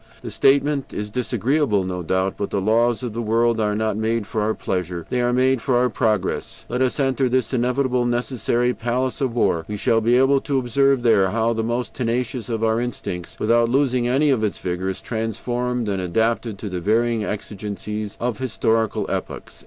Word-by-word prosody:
The - - -6
statement 140 0 +2
is 105 0 -4
disagreeable, 125 -1 +1
no 90 -1 -3
doubt; 95 +3 0
but 100 - -3
the 100 - -1
laws 115 +4 +2
of 120 -3 -4
the 115 - -3
world 115 +1 +2
are 105 -1 +1
not 110 -1 0
made 110 0 0
for 110 - -2
our 110 +1 0
pleasure, 90 -2 -3
they 125 - +1
are 120 0 +2
made 130 0 +2
for 125 0 +1
our 125 0 +2
progress. 110 -7 -1
Let 125 +2 -1
us 130 +2 +1
enter 135 -1 +1
this 130 +2 0
inevitable, 125 0 +1
necessary 120 0 0
palace 125 +4 -2
of 130 -4 -1
war; 85 -8 +1
we 105 - -4
shall 115 +2 +2
be 120 +3 +3
able 135 +1 +4
to 140 -2 -1
observe 135 +1 +2
there 100 -5 +4
how 115 +2 +1
the 110 0 -2
most 120 +2 -2
tenacious 125 0 -2
of 115 -1 -2
our 110 +1 +2
instincts, 90 -7 -5
without 115 +1 +3
losing 130 -2 +2
any 140 +4 +3
of 120 -5 +1
its 105 - -1
vigor, 90 +1 -3
is 95 - -5
transformed 120 +1 -2
and 100 -2 -1
adapted 110 +4 0
to 105 +1 -6
the 90 -1 -4
varying 115 +3 +1
exigencies 105 0 -5
of 120 0 -2
historical 115 -3 0
epochs." - - -5
115 Hz, 195 wpm, -22 LUFS, 105-125 Hz, -, able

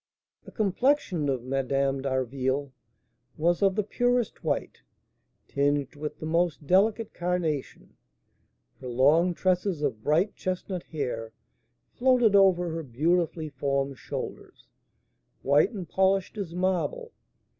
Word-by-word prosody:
The - - -11
complexion 205 - +1
of 130 -3 -1
Madame 135 +1 0
d'Harville 130 +1 -1 0.7
was 170 +3 +1
of 195 -2 +3
the 210 - +1
purest 245 +2 0
white, - - -2 0.7
tinged 145 +1 0
with 150 +1 -5
the - - -7
most 165 -1 0
delicate 210 +7 +2
carnation; 175 -5 -3 0.8
her 130 - -8
long 150 +8 +3
tresses 185 -3 0
of 120 -7 -1
bright 165 +7 +2
chestnut 185 0 -3
hair 125 -9 -5 0.6
floated 245 -4 +3
over 180 -3 +4
her 165 +1 -3
beautifully 160 +4 0
formed 140 -1 -2
shoulders, - - -7 0.8
white 140 +2 +4
and 195 -8 -7
polished 190 +3 +1
as 190 -5 -5
marble. 190 - -1
165 Hz, 115 wpm, -27 LUFS, 140-190 Hz, 0.8 s, over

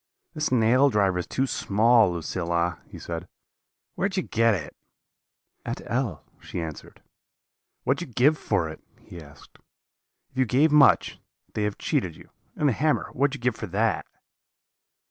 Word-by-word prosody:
"'This 155 -4 -2
nail 125 +3 +4
driver 100 -6 +1
is 90 - -4
too 135 - 0
small, 110 -3 +3
Lucilla,' 85 0 -2
he - - -11
said; 85 +1 -6 0.7
'where 195 - 0
did 190 - -6
you 185 - +1
get 115 -1 +2
it?' 75 -5 -7 0.9
"'At - - -4
L 120 - -2
,' - - -35
she - - -6
answered. 80 -3 -8 0.8
"'What 135 +3 +1
did 175 - -5
you 125 - -17
give 145 +5 +5
for 100 - -1
it?' 80 - -10 0.2
he 85 - -11
asked. 75 -1 -17 0.7
'If - - -17
you 130 - +4
gave 140 +7 +3
much, 150 -2 +5 0.3
they 110 - -2
have 105 - -3
cheated - - -1
you; - - -16 0.2
and 150 - +1
the 135 - +3
hammer, 150 +7 0
what 140 +3 +2
did 140 -2 -8
you - - -16
give - - -15
for 110 - -4
that?' 105 +5 0
115 Hz, 175 wpm, -25 LUFS, 90-135 Hz, 0.9 s, give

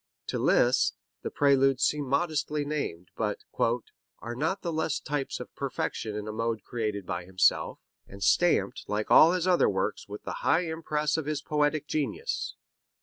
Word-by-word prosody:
To - - -1
Liszt - - +3 0.3
the - - -3
Preludes 135 -2 +3
seem 150 -2 +1
modestly 150 0 0
named, 115 - -4
but - - -2 0.8
"are 120 - -6
not 160 +9 -1
the 170 -2 -2
less 160 -1 0
types 145 -1 -3
of - - -9
perfection 105 -1 -3
in 105 0 -5
a - - -3
mode 115 0 -2
created 105 -5 -3
by 90 -1 -4
himself, 95 0 +2 0.3
and 100 0 -8
stamped - - +2
like 105 +1 -2
all 165 +3 +8
his 185 0 0
other 180 -2 +4
works 95 -1 -2
with 105 +1 -8
the - - -5
high 165 - +3
impress 160 -2 -1
of 155 -2 -3
his 150 -1 -2
poetic 150 0 +1
genius. 155 - -2
145 Hz, 165 wpm, -28 LUFS, 110-155 Hz, 0.8 s, all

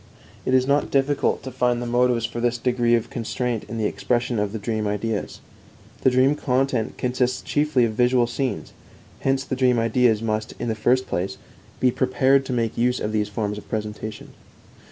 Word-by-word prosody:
It 130 - +3
is 130 0 +4
not 140 +2 +1
difficult 140 +1 +1
to 130 - -6
find 125 -1 +1
the 120 - -4
motives 120 -1 +2
for 120 - -5
this 120 0 +1
degree 120 -1 +2
of 115 0 -2
constraint 120 -1 -2
in 115 - -6
the 110 - 0
expression 120 +1 0
of 105 +1 -2
dream 110 0 -2
ideas. 105 +1 -3 0.6
The - - +5
dream 130 +2 +4
content 130 -4 0
consists 125 0 0
chiefly 145 -4 +2
of 110 - -2
visual 125 +1 +3
scenes; 120 - -3 0.5
hence 135 0 +1
the 140 - -3
dream 125 -2 +3
ideas 115 -1 +2
must, 110 -1 -2
in 120 - -3
the - - +1
first 125 +4 +2
place, 95 +2 -3 0.4
be 125 - +3
prepared 130 +2 +2
to - - -3
make 115 -3 -1
use 125 +1 +2
of 105 - -2
these 105 -1 0
forms 105 0 -3
of - - -17
presentation. 105 0 -5
120 Hz, 185 wpm, -23 LUFS, 110-130 Hz, 0.6 s, The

